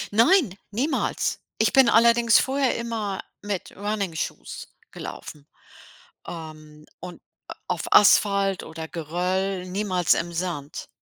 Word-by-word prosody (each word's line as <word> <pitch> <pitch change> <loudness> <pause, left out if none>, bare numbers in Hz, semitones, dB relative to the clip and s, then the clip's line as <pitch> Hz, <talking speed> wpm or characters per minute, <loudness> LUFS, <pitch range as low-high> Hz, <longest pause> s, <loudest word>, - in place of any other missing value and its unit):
Nein, 250 - +4
niemals. 255 +10 -1 0.2
Ich - - +2
bin 265 -3 +6
allerdings 235 0 +5
vorher 270 -2 +1
immer 220 -4 -3 0.2
mit 205 -3 -5
Running 205 -3 -3
Shoes - - -6 0.2
gelaufen, 145 -1 -9 0.8
ähm, 155 -2 -10
und 180 0 -10 0.5
auf - - -2
Asphalt 200 -2 +4
oder 160 0 -8
Geröll 180 +3 -2
niemals 185 -2 +1
im 170 0 -3
Sand. 165 -4 -5
195 Hz, 110 wpm, -24 LUFS, 170-225 Hz, 0.8 s, bin